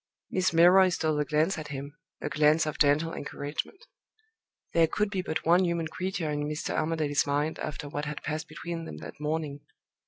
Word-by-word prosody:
Miss 185 0 +2
Milroy 180 +3 +7
stole 155 -3 0
a 150 - +1
glance 155 +6 +1
at 155 - -6
him 140 +1 -6 0.3
a - - -2
glance 150 +2 +4
of 155 - -4
gentle 150 +3 +3
encouragement. 145 - -5 0.9
There 165 -1 +5
could 210 +5 -1
be 190 -2 -1
but 160 -4 -3
one 175 +3 +5
human 170 -2 -1
creature 185 -2 -2
in 145 0 -2
Mr. 150 0 -3
Armadale's 155 -3 +1
mind 145 +2 0
after 150 0 -5
what 145 +1 -4
had 150 -1 -5
passed 155 +1 -3
between 165 +2 -6
them 75 - -7
that - - -9
morning! 150 -1 -2
155 Hz, 185 wpm, -28 LUFS, 150-170 Hz, 0.9 s, Milroy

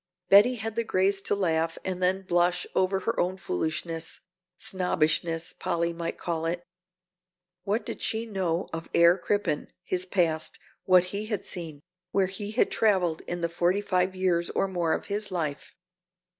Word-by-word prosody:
Betty 210 +6 +7
had 225 -1 -5
the 230 - +1
grace 195 -1 +2
to 205 - +1
laugh 165 -4 0
and 185 -1 -3
then 190 +1 +2
blush 175 -1 +2
over 190 +1 +1
her 230 - -1
own 185 +2 0
foolishness, 165 - -3 0.4
snobbishness 165 -5 0
Polly 170 -2 -1
might 170 0 -4
call 165 -1 -2
it. 175 +1 -2 1.0
What 210 +4 0
did - - -5
she 225 +1 -1
know 185 -5 -1
of 165 0 -5
Herr 170 +1 +7
Crippen, 190 -5 -1 0.2
his 185 0 -1
past, 165 -4 +1 0.3
what 185 -1 +6
he 210 +2 -3
had 210 -4 -3
seen, 160 -5 -4 0.3
where 195 0 +2
he 195 +2 -5
had 220 +4 +2
traveled 185 -7 +2
in 175 0 -3
the 170 - +1
forty 175 +4 +1
five 185 -2 0
years 180 -2 +1
or - - 0
more 175 -4 0
of - - -3
his 205 +1 -2
life? 155 -6 -3
180 Hz, 165 wpm, -27 LUFS, 170-195 Hz, 1.0 s, Betty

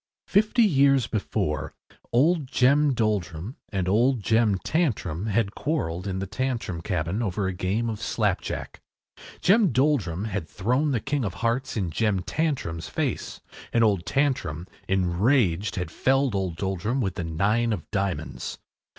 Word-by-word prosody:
Fifty 215 +4 +3
years 140 - +4
before 110 -3 -2 0.4
old 150 +4 +3
Jem 140 +2 +3
Doldrum 105 - -1
and 95 -3 -2
old 115 +4 +2
Jem 110 -3 +3
Tantrum 105 - -1
had 105 -1 +1
quarrelled 95 - -2
in 95 -1 -2
the 95 - -2
Tantrum 115 -5 -3
cabin 85 +4 -2
over 100 -2 -1
a 95 - -1
game 100 +6 -1
of 110 -1 -4
slapjack. 105 -5 -2 0.6
Jem 200 -2 +4
Doldrum 115 - +1
had 100 -7 -4
thrown 125 - 0
the 130 -5 +1
king 135 +3 -1
of 100 -3 -3
hearts 115 +4 -1
in 95 -6 -1
Jem 105 +1 +1
Tantrum’s 135 - -2
face, - - -3 0.3
and 115 - +3
old 100 -5 +2
Tantrum, 125 - 0 0.2
enraged, 95 +1 +2
had 90 -3 -3
felled 135 0 +2
the 100 - -1
old 90 -3 -3
Doldrum 95 +7 -2
with 95 -7 0
the 85 - -4
nine 100 +9 +1
of 95 -8 -3
diamonds. 100 -3 -3
110 Hz, 150 wpm, -25 LUFS, 95-130 Hz, 0.6 s, years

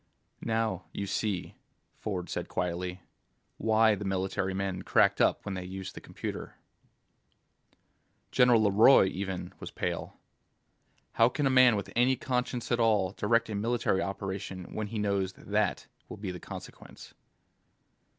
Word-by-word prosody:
"Now 110 -5 0
you 100 - -3
see," 100 -1 -2 0.5
Ford 90 -4 -3
said - - -4
quietly, 90 +1 -3 0.5
"why 110 0 +4
the 105 - -4
military 95 0 -1
men 95 -1 -2
cracked - - +3
up - - +2
when 100 - -3
they 90 -1 -4
used 95 +1 -7
the - - -9
computer." - - -6 1.8
General 120 -3 +5
LeRoy, 105 +4 +6
even, 95 -1 -5
was - - -7
pale. - - -4 0.9
"How 115 +1 +4
can 145 +3 -1
a 135 - +3
man 130 -3 +6
with 100 -2 -4
any 125 +2 +4
conscience 125 -1 -2
at 120 - +2
all 105 -5 +3
direct 115 +2 +1
a - - -2
military 105 -2 0
operation 95 -2 -5
when 110 -1 -3
he 110 - -5
knows 100 -2 0
that 100 - -14
that 105 -2 +1 0.2
will - - -7
be 100 -2 -4
the 90 - -7
consequence?" - - -11
100 Hz, 145 wpm, -29 LUFS, 95-115 Hz, 1.8 s, LeRoy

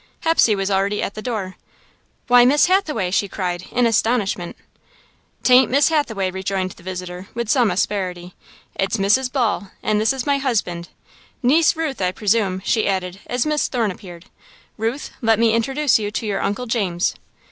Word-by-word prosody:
Hepsey 325 -9 +3
was 195 0 -2
already 195 +2 0
at 200 - -3
the 215 - -7
door. 210 -6 -4 0.7
"Why, 245 -1 +6
Miss 280 +4 +5
Hathaway!" 310 - 0
she 200 +1 +1
cried, 180 -2 -4
in 245 0 +2
astonishment. 220 -5 0 0.9
"'T 250 - +4
ain't 255 +1 +6
Miss 280 +3 +3
Hathaway," 220 -12 0
rejoined 190 0 -3
the - - -15
visitor, 180 0 -7
with 235 -2 -3
some 245 -4 +3
asperity, 180 -2 -2 0.4
"it's 195 +4 -1
Mrs. 220 +6 +2
Ball, 230 -7 -1
and 215 0 +1
this 220 - +3
is 265 -2 -4
my 280 -1 +1
husband. 200 -10 -2 0.5
Niece 310 +8 +4
Ruth, 315 -8 -3
I 180 -1 +1
presume," 195 -2 0
she 220 -2 +1
added, 185 -1 -2
as 245 -1 -1
Miss 300 -1 0
Thorne 230 -5 -1
appeared. 175 -1 -11 0.5
"Ruth, 230 +6 -3
let 225 -2 +3
me 230 0 +3
introduce 265 +3 +2
you 205 -1 -2
to 220 - -4
your 205 -2 -2
Uncle 205 +5 -2
James." 195 -7 0
215 Hz, 170 wpm, -20 LUFS, 190-250 Hz, 0.9 s, Why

